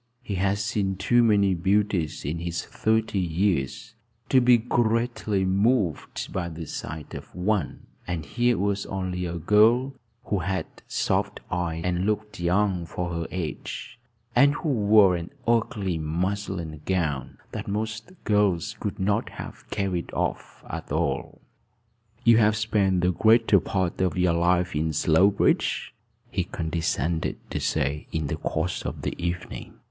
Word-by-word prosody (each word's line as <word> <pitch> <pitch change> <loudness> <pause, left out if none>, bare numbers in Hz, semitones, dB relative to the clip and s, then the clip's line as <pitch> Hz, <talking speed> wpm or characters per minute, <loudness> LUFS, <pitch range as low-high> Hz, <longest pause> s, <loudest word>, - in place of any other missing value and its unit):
He 105 - -4
had 95 +1 +1
seen 100 -1 -1
too 115 +6 +3
many 100 -4 +4
beauties 95 -2 0
in 80 +4 -2
his 85 0 -3
thirty 110 -2 0
years 85 -5 -1 0.4
to 130 - +5
be 120 0 +6
greatly 115 -3 0
moved 100 - 0
by 90 -2 -2
the 80 0 -7
sight 80 0 -6
of - - -9
one; 90 -4 -1 0.2
and 85 -4 -3
here 120 - +1
was 100 +1 -1
only 90 -2 -3
a 85 0 -4
girl 110 - +4 0.3
who 100 - -1
had 95 +2 -1 0.2
soft - - 0
eyes, 85 -2 -2
and 90 +2 0
looked 105 -1 -2
young 90 0 +1
for 85 0 -3
her 85 -1 -3
age, 90 +6 -5 0.4
and 140 +4 +5
who 155 - -2
wore 105 -6 +5
an 85 0 -5 0.2
ugly 105 -6 +1
muslin 85 -1 -3
gown, 80 -8 -1
that - - -5
most 110 - -3
girls 105 -6 +1
could 100 -1 -3
not 100 +2 +1
have - - -9
carried 95 -4 -2
off - - -3
at - - -6
all. - - -1 0.8
"You 115 -2 +6
have 105 -1 +4
spent 100 -4 +1
the 90 +1 +3
greater 110 +1 +5
part 95 -1 -1
of 90 -3 +1
your 90 -1 +3
life 90 0 +2
in 80 +1 0
Slowbridge?" 90 +7 +2 0.4
he - - 0
condescended 80 0 -1
to - - -1
say 70 +3 -1
in 80 -2 -1
the 75 +2 -2
course 80 +2 -2
of - - -5
the - - -1
evening. 85 +1 -4
95 Hz, 145 wpm, -26 LUFS, 85-105 Hz, 0.8 s, be